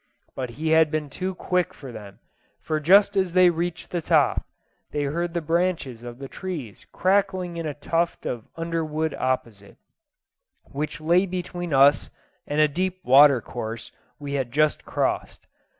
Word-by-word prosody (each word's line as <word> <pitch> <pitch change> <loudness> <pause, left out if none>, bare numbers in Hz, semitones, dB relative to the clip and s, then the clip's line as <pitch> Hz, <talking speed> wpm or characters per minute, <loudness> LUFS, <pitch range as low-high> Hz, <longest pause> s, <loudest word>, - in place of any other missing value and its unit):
But 130 -2 -4
he 160 +1 -1
had 160 0 +5
been 150 -2 -3
too 185 +3 -4
quick 180 -1 -1
for 135 -3 -10
them, 105 -4 -10 0.4
for 155 -1 -2
just 195 +7 +5
as 190 -3 +1
they 180 -1 +6
reached 170 0 -4
the 175 - -1
top, - - +2 0.5
they 145 - -2
heard 170 +4 -2
the 170 - 0
branches 165 -7 -1
of 120 0 -9
the 135 +1 -7
trees 150 - -7
crackling 185 -2 +1
in 165 -1 -3
a 145 - -4
tuft 165 +3 -1
of 120 -3 -4
underwood 160 -2 -2
opposite, 115 -6 -3 0.9
which 150 +2 -5
lay 175 +5 +3
between 175 -1 -5
us 140 +1 +5 0.4
and 145 - -1
a 155 - +6
deep 185 +5 -2
water 135 0 +7
course 115 -1 -6 0.3
we 145 -1 -6
had 130 -4 -2
just 150 +3 +1
crossed. - - -2
155 Hz, 160 wpm, -24 LUFS, 140-175 Hz, 0.9 s, water